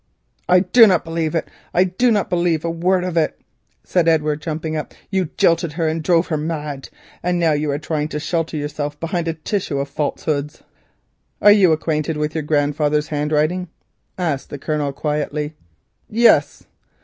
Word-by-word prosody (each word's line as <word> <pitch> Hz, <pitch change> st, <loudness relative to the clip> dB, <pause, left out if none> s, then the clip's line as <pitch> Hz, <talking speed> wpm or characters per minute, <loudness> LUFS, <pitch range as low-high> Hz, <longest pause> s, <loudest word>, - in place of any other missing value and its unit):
"I 180 Hz, 0 st, +6 dB
do 225 Hz, +5 st, +6 dB
not 180 Hz, -5 st, +2 dB
believe 165 Hz, -1 st, -2 dB
it, 165 Hz, -, -1 dB, 0.3 s
I 180 Hz, -, +5 dB
do 190 Hz, +7 st, +1 dB
not 210 Hz, -4 st, +1 dB
believe 170 Hz, -3 st, 0 dB
a 165 Hz, -, 0 dB
word 180 Hz, +2 st, +1 dB
of 180 Hz, -2 st, -3 dB
it," 155 Hz, -2 st, 0 dB, 0.4 s
said 175 Hz, -2 st, +1 dB
Edward, 155 Hz, -2 st, +2 dB
jumping 160 Hz, 0 st, -3 dB
up. 155 Hz, -, -5 dB, 0.2 s
"You 190 Hz, -2 st, +1 dB
jilted 165 Hz, -2 st, +2 dB
her 165 Hz, 0 st, -1 dB
and 160 Hz, +1 st, -1 dB
drove 170 Hz, +1 st, +2 dB
her 155 Hz, -, 0 dB
mad, 150 Hz, -3 st, -4 dB, 0.3 s
and 180 Hz, 0 st, 0 dB
now 165 Hz, -2 st, +2 dB
you 150 Hz, 0 st, 0 dB
are 140 Hz, -, 0 dB
trying 150 Hz, 0 st, -2 dB
to 150 Hz, -, -4 dB
shelter 165 Hz, 0 st, -2 dB
yourself 145 Hz, 0 st, -4 dB
behind 165 Hz, 0 st, -2 dB
a 165 Hz, -, -1 dB
tissue 160 Hz, -2 st, -2 dB
of 140 Hz, 0 st, -2 dB
falsehood." 150 Hz, 0 st, -2 dB, 0.9 s
"Are 205 Hz, -, +7 dB
you 200 Hz, -5 st, +6 dB
acquainted 155 Hz, -1 st, -1 dB
with 150 Hz, 0 st, -2 dB
your 160 Hz, -, -1 dB
grandfather's 150 Hz, 0 st, 0 dB
handwriting?" 155 Hz, +4 st, 0 dB, 0.5 s
asked 160 Hz, -7 st, -2 dB
the 145 Hz, -, -6 dB
Colonel 150 Hz, 0 st, -2 dB
quietly. 150 Hz, +1 st, -2 dB, 0.6 s
"Yes." 230 Hz, +2 st, +3 dB
160 Hz, 175 wpm, -20 LUFS, 150-175 Hz, 0.9 s, Are